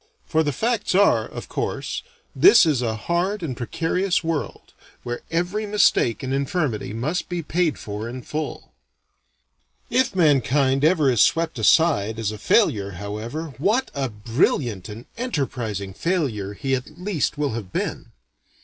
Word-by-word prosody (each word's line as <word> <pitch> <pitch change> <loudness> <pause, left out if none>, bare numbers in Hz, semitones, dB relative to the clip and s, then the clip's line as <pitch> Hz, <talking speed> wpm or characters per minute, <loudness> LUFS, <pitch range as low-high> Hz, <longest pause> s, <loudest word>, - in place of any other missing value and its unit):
For 160 -1 +1
the 150 -2 0
facts 220 - -1
are 200 +1 +4
of - - -8
course - - -3 0.3
this 390 - +7
is 150 -6 +1
a 115 -2 -1
hard 175 - -1
and 135 -6 -3
precarious 170 +9 -1
world, 165 -3 -4 0.3
where 120 0 -4
every 180 +6 -1
mistake 200 - +2
and 130 0 -2
infirmity 140 - -1
must 150 +10 -2
be 175 -2 -3
paid 165 0 0
for 105 +1 -5
in 125 +1 -7
full. 150 - -5 1.2
If 255 -6 +2
mankind 140 -4 +3
ever 155 -4 +4
is 120 - +3
swept 165 -6 +2
aside 110 -4 +3
as 110 -2 -1
a 110 - -8
failure 100 -2 +2
however, 110 - -5
what 220 - +1
a 135 -2 -2
brilliant 110 -1 0
and 110 +3 -9
enterprising 120 - -3
failure 120 - -1
he 135 +4 -2
at 130 -1 -3
least 180 -6 -1
will 145 -1 0
have 110 -5 -6
been. - - -3
140 Hz, 150 wpm, -23 LUFS, 115-170 Hz, 1.2 s, this